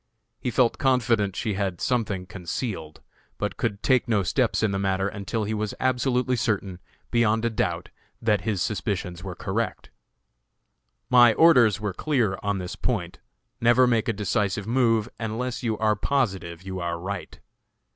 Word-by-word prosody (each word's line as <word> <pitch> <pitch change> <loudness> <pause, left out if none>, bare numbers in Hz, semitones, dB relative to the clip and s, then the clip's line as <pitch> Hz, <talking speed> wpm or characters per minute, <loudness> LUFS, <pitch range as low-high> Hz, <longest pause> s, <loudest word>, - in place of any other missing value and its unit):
He 125 - -2
felt 120 0 +2
confident 115 -8 +2
she 110 -3 -1
had 95 -3 -2
something 105 -7 -1
concealed, 90 - -5 0.4
but - - -2
could 105 -2 -3
take 130 0 +3
no 105 -4 +2
steps 90 - +1
in 110 - +2
the 95 - -1
matter 95 0 0
until 105 +2 -3
he 105 +1 -2
was 105 -1 -2
absolutely 125 0 +1
certain, 100 -6 -1 0.3
beyond 115 -1 +2
a 115 - +1
doubt, 110 - -2 0.3
that 110 -4 +1
his 105 -6 -1
suspicions 90 -5 -3
were 95 -2 -6
correct. 105 +4 -3 1.2
My 120 -3 +7
orders 125 - +6
were 105 -3 -3
clear 120 -8 0
on 100 -1 -1
this 90 -1 -5
point 90 -8 -3 0.4
never 120 +2 +5
make 115 -3 +1
a 115 - +1
decisive 105 -1 -1
move 115 -2 +2
unless 115 +2 -3
you 115 -4 -1
are 110 -1 +2
positive 95 -9 -1
you 95 0 -5
are 85 -1 -2
right. 95 +2 -6
110 Hz, 155 wpm, -25 LUFS, 95-120 Hz, 1.2 s, My